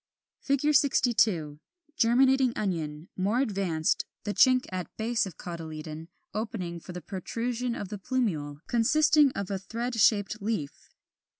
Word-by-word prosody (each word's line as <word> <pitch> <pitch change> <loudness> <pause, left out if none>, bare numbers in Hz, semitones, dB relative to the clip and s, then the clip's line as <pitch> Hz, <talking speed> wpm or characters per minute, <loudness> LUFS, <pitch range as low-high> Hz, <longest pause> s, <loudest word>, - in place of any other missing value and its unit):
] - - -25
[Illustration: 280 +2 +3
Fig. - - +1
62. 215 - +2 0.4
Germinating 260 +1 +4
Onion, 160 -5 -3
more 200 +6 +1
advanced, 190 -10 0 0.2
the 205 - -2
chink 255 +1 +5
at 180 -3 -4
base 225 -1 0
of 175 - -10
cotyledon 160 -2 -7 0.3
opening 195 -5 -4
for 180 - -10
the 180 0 -7
protrusion 230 +7 -3
of 200 - -5
the 210 -1 -6
plumule, 170 - -2
consisting 295 +4 +4
of 200 0 -4
a 195 - -1
thread 235 +6 -4
shaped 215 -1 +2
leaf. 200 -9 -4
205 Hz, 140 wpm, -28 LUFS, 170-240 Hz, 0.4 s, chink